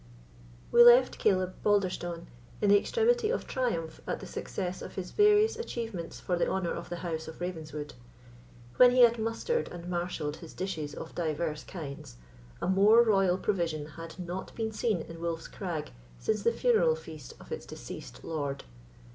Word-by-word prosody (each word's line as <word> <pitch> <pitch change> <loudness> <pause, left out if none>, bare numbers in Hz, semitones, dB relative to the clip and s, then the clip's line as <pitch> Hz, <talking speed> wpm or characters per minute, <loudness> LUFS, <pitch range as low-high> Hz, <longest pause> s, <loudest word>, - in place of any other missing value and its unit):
We 240 - +7
left 245 +2 +7
Caleb 185 -3 +2
Balderstone 180 -4 0 0.3
in 205 - +2
the 205 0 +7
extremity 465 - +2
of - - -1
triumph 200 - -2
at - - -2
the - - -8
success 185 -1 -4
of - - -8
his 185 -2 -5
various 420 +1 +5
achievements 230 - -5
for 180 - -1
the 175 - +1
honour 190 -2 -1
of 170 - -6
the 175 - -3
house 160 -2 -3
of 160 - -9
Ravenswood. 155 -4 -5 0.8
When 250 - +9
he 250 +1 +4
had 235 -1 +6
mustered 230 - -1
and 175 0 -8
marshalled 175 -4 -3
his 165 -2 -11
dishes 160 -6 -4
of 160 - -8
divers 155 -2 -2
kinds, 140 - -8 0.5
a - - 0
more 205 +5 +6
royal 195 -5 +3
provision 170 -6 -1
had 165 +1 -9
not 180 +1 -6
been 220 -1 -2
seen 215 -5 0
in 165 0 -10
Wolf's 165 -1 -3
Crag 170 -6 -5 0.3
since 215 - -1
the 235 - +3
funeral 475 - +3
feast 480 - -10
of - - -14
its 470 - -5
deceased - - -9
lord. 145 -4 -3
185 Hz, 170 wpm, -30 LUFS, 165-230 Hz, 0.8 s, When